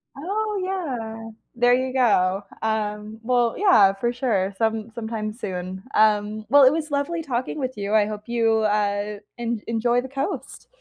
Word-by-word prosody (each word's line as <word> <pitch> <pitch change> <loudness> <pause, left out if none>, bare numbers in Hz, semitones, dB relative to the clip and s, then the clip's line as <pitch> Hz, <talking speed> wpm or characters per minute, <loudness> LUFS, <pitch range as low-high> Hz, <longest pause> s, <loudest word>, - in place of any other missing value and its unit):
Oh, 410 +7 -2
yeah. 240 -12 -4 0.3
There 245 +1 +4
you 260 +1 +1
go. 200 -6 +2 0.2
Um, 215 0 -2
well, 240 -1 +2
yeah, 215 - +5
for 235 +5 -1
sure. 200 -6 0
Some 225 0 -1
sometime 220 -2 -4
soon. 185 -4 -6
Um, 215 0 +2
well, 285 +1 +7
it 260 - +7
was 310 -2 -3
lovely 290 +4 -1
talking 255 +2 -3
with 255 -4 -3
you, 200 +1 -3
I 210 -1 +5
hope 210 0 -6
you, 225 -2 +2
uh, 205 -1 0 0.2
en 235 -2 -2
enjoy 235 +2 +1
the 260 - -7
coast. 275 +1 -5
225 Hz, 160 wpm, -23 LUFS, 210-260 Hz, 0.3 s, well